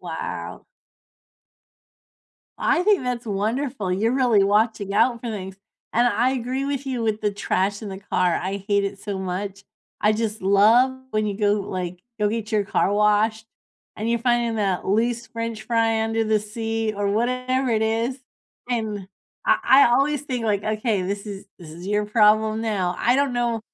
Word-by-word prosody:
Wow. - - -6 1.9
I 345 - +2
think 410 -3 +3
that's 245 -2 -3
wonderful, 215 0 -2
you're 220 +5 +1
really 245 -6 +3
watching 205 -1 +1
out 235 +2 +3
for 235 - -5
things, 190 -3 -6 0.4
and 240 +1 +3
I 245 +1 +2
agree 260 +1 -2
with 280 -1 -3
you 255 -3 -2
with 220 -1 -1
the 210 -1 0
trash 200 +1 -1
in 210 - -5
the 190 -1 -6
car, 180 -3 0
I 195 +1 -4
hate 200 -1 +2
it 200 0 -4
so 200 -2 -4
much, 190 +1 -4 0.4
I 210 - +4
just 220 0 -2
love 215 +7 +5 0.2
when 215 -2 0
you 205 -2 -3
go, 205 -1 +2
like, 180 -1 -4 0.2
go 210 - +3
get 220 0 -4
your 210 -2 +2
car 200 - +1
washed 210 +1 +2 0.5
and 215 +2 -3
you're 235 - +2
finding 240 -1 +1
that 195 -4 -1
loose 230 +3 0
French 230 -1 -5
fry 225 -1 +1
under 225 0 0
the 215 0 +2
seat 225 0 -3
or 205 0 -1
whatever 255 +4 0
it 220 -1 +1
is, 230 +4 -1 0.5
and 215 -5 -2 0.4
I - - +5
I 270 +1 +7
always 275 +4 +2
think, 255 -5 -3
like, 205 -1 0
"Okay, 215 -2 0
this 200 +3 -4
is 200 -2 -7
this 170 - -11
is 170 +3 -10
your 210 +1 0
problem 215 0 +3
now," 190 -5 -1
I 245 - +3
don't 280 -2 +1
know. 240 -2 0
220 Hz, 175 wpm, -23 LUFS, 205-235 Hz, 1.9 s, I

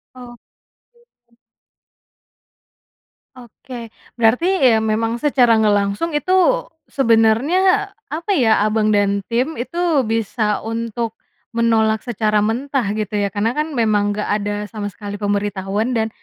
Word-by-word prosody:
Oke. 240 -2 -14 2.8
Oke. 240 -1 -11 0.2
Berarti 240 +8 +2 0.3
ya 220 - +3
memang 225 +2 -1
secara 245 -5 +3
nggak 210 -1 +3
langsung 200 +11 -1
itu 365 +5 -1 0.6
sebenarnya 280 - +2 0.2
apa 330 +6 -3
ya, 225 - +3
Abang 215 0 +1
dan 200 0 +2
tim 250 +7 -1
itu 300 +7 -6 0.3
bisa 220 -1 -1
untuk 230 0 -3 0.4
menolak 225 -2 +2
secara 215 -2 0
mentah, 250 +2 -1
gitu 215 -1 -4
ya. 200 - 0
Karena 205 +4 -1
kan 305 +3 -3
memang 205 -3 +1
nggak 210 - -3
ada 205 0 -3 0.2
sama 210 -3 -5
sekali 205 +1 -8
pemberitahuan 205 +2 -1
dan 220 0 0
225 Hz, 120 wpm, -19 LUFS, 210-245 Hz, 2.8 s, ya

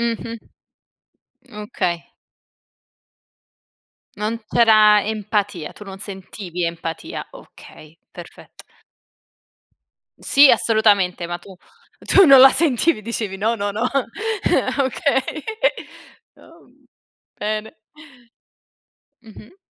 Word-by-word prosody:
Mh-mh. 230 0 -3 1.1
Okay. 210 -5 -3 2.2
Non 220 +2 -2
c'era 215 -3 +5
empatia, 205 -5 -3
tu 210 - -13
non 195 -1 -10
sentivi 190 -3 -6
empatia. 165 -1 -6
Okay, 155 +2 -16
perfetto. - - -14 1.5
Sì, 280 0 +5
assolutamente, 205 -6 +2
ma 175 - -4
tu 195 - -15 0.4
tu 390 - +4
non 275 -4 +8
la 270 - +10
sentivi. 295 -3 +1
Dicevi 215 -3 -4
"No, 220 +4 0
no, 205 -2 -3
no". 215 +4 -4 1.0
Okay. 275 +1 -1 0.9
Oh, - - -19
uhm. - - -28 0.5
Bene. 215 +1 -4 1.5
Mh-mh. 220 - -16
215 Hz, 85 wpm, -20 LUFS, 195-235 Hz, 2.2 s, la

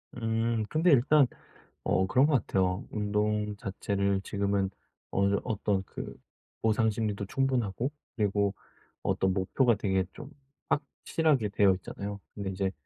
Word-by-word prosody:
음. 115 -1 0
근데 165 +3 +3
일단 140 +1 +5 0.6
어 95 - +2
그런 130 +8 +4
것 155 - +1
같아요. 95 +5 +1
운동 105 0 0
자체를 100 0 -1
지금은 100 -1 0 0.4
어느 100 +1 +2
정 100 - +1
어떤 105 -4 0
그 - - -7 0.5
보상 110 0 +3
심리도 105 -2 -2
충분하고 125 0 0 0.2
그리고 100 -2 +1 0.5
어떤 95 -1 +1
목표가 115 +6 +2
되게 95 -2 0
좀 145 -2 -9 0.4
확실하게 145 -4 +1
되어 100 -1 +4
있잖아요. 100 +2 -6 0.2
근데 100 -2 -3
이제 95 0 -1
105 Hz, 280 characters per minute, -29 LUFS, 100-120 Hz, 0.6 s, 일단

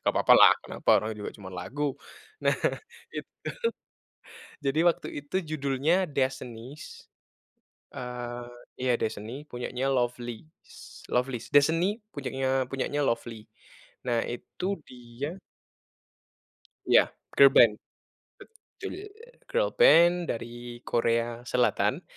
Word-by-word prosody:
Nggak - - +1
apa-apa - - +5
lah, - - +9
kenapa, - - -1
orang 110 - -3
juga 105 - -6
cuman 95 -3 -10
lagu. 140 +9 -3 0.4
Nah, - - +2 0.6
itu - - -6 1.4
jadi 140 +3 +2
waktu 170 - -1
itu 145 +5 -5
judulnya 155 +4 +1
"Destinies." 130 -1 -4 0.9
Eee, 120 -1 -5 0.4
iya 130 -1 +2
"Destiny," 110 +7 -4
punyanya 125 +1 -3
Lovelyz 120 -2 -1 0.6
Lovelyz. 125 -1 -1
"Destiny" 165 +8 +3 0.2
punyanya 135 -2 -1
punyanya 135 +2 -2
Lovelyz. 115 -2 -3 0.6
Nah, 120 -2 +1
itu 185 +10 -4
dia 125 +8 -7 1.5
Iya, - - +8 0.4
girlband. 135 -5 +7 0.7
Betul, 450 -1 -11 0.6
girlband 485 - +5
dari 120 +1 -6
Korea 115 0 +1 0.2
Selatan, 125 0 +1
130 Hz, 95 wpm, -28 LUFS, 120-145 Hz, 1.5 s, lah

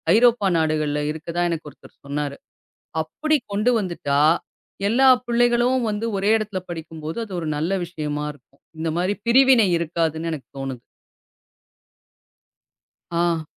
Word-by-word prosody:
ஐரோப்பா 230 -3 +4
நாடுகள்ல 155 -2 0
இருக்கிறதா 165 +3 -3
எனக்கு 165 -2 -4
ஒருத்தர் - - -19
சொன்னாரு. 145 0 -3 0.7
அப்படி 310 - 0 0.2
கொண்டு 215 +5 +2
வந்துட்டா, 170 -7 -1 0.7
எல்லா 260 +5 +4 0.2
பிள்ளைகளும் 240 +1 +3
வந்து 210 +2 -3
ஒரே 200 +2 +2
இடத்துல 205 -3 -4
படிக்கும்போது 160 -1 -6
அது 200 - -10
ஒரு 160 - -3
நல்ல 165 +6 -1
விஷயமா 150 -3 -4
இருக்கும். 140 -1 -26 0.2
இந்த 160 0 -1
மாரி 185 +4 0
பிரிவினை 255 -3 +6
இருக்காதுன்னு 165 0 -1
எனக்குத் 140 -2 -9
தோணுது. 135 -3 -5 2.4
ஆஹ். 170 -2 +1
170 Hz, 120 wpm, -23 LUFS, 155-220 Hz, 2.4 s, பிரிவினை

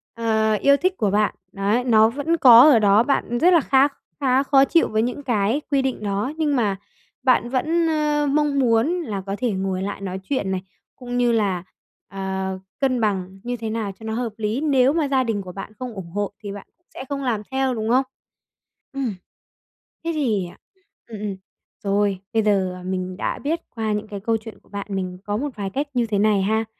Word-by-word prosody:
ờ, 220 -1 +1
yêu 280 +7 +4
thích 370 +4 0
của 205 -3 +1
bạn. 210 +1 +1 0.2
Đấy, 200 +5 0
nó 220 -3 +5
vẫn 290 +7 -1
có 245 -6 +9
ở 250 -6 +6
đó, 205 +1 +5
bạn 240 -2 0
rất 360 +5 +5
là 340 - +7
khác 275 +1 +3 0.2
khá 265 -1 +3
khó 275 -1 +5
chịu 335 +4 +3
với 215 0 0
những 250 +5 -3
cái 235 +1 +1
quy 275 -1 +3
định 265 -4 -2
đó. 205 +5 -1
Nhưng 300 -3 +1
mà 210 -6 +1 0.5
bạn 250 -2 +3
vẫn, 320 +6 +1
a, 300 -1 +1
mong 290 0 +1
muốn 230 -1 +3
là 205 - -4
có 195 0 -3
thể 245 -1 0
ngồi 190 -1 -2
lại 200 0 -4
nói 190 -1 -4
chuyện 200 -4 -2
này, 185 -1 -1 0.3
cũng 245 -1 -5
như 245 -1 +3
là, 200 -6 0 0.4
ờ, 190 -1 -4 0.2
cân 255 -3 +1
bằng 195 -3 -1
như 245 0 -3
thế 225 -1 -4
nào 220 -2 -2
cho - - -13
nó 220 - -3
hợp 230 -1 -3
lý. 220 +4 -1
Nếu 275 -3 +3
mà 315 -3 +1
gia 265 -2 +2
đình 225 -4 -1
của 185 -2 -8
bạn 195 +3 -8
không 250 -2 -5
ủng 190 -5 -8
hộ 205 +2 -2
thì 205 - -5
bạn 200 0 -9
cũng 350 - -48
sẽ - - -7
không 280 -1 -3
làm 235 -5 0
theo, 265 -1 +1
đúng 220 -1 -3
không? 255 +3 +4 0.9
Ừm. 265 -7 -2 0.9
Thế 335 - 0
thì, 225 - 0
ờ, 175 - -13 0.5
ừm, 220 -3 -8
ừm. 205 -2 -3 0.5
Rồi, 200 -1 +1
bây 225 -1 +2
giờ 190 -3 0
mình 185 0 -3
đã - - -2
biết 320 +4 -1 0.2
qua 220 -2 -1
những 210 +1 -3
cái 205 -1 -6
câu 225 +3 0
chuyện 220 -2 -11
của - - -28
bạn, 200 0 -6
mình 185 -2 -3
có 205 0 -1
một 290 +5 -2
vài 200 -2 -3
cách 280 +9 -2
như 245 -2 +1
thế 210 -2 0
này 210 -1 +3
ha. 220 +3 +1
225 Hz, 220 wpm, -22 LUFS, 200-265 Hz, 0.9 s, có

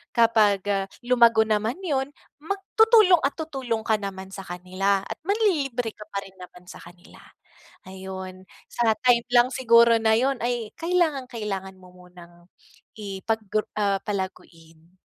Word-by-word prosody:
kapag, 220 -4 +3
ah, 195 -1 -1 0.2
lumago 235 -2 +4
naman 220 +2 -1
'yon, 275 -6 -1 0.3
mag 325 +7 -4 0.2
tutulong 435 -6 +6
at 280 - -8
tutulong 265 -8 -4
ka 220 -1 +1
naman 190 -1 -7
sa 195 0 -9
kanila 185 +2 -1
at 220 - -8
manlilibre 290 - 0
ka 210 0 -13
pa 200 -2 -5
rin 195 - -15
naman 180 0 -13
sa - - -12
kanila. 175 0 -16 0.7
Ayon. 190 0 -9 0.2
Sa 225 -2 +1
time 240 -2 +3
lang 240 +1 +5
siguro 235 -3 +4
na 220 0 +3
'yon 260 +2 0
ay 240 -2 -3
kailangang-kailangan 250 - -2
mo 185 -1 -18
munang 175 -1 -17 0.5
ipag 210 +2 -4 0.3
ah, 200 -2 0
palaguin. 170 -4 -7
220 Hz, 140 wpm, -24 LUFS, 190-245 Hz, 0.7 s, tutulong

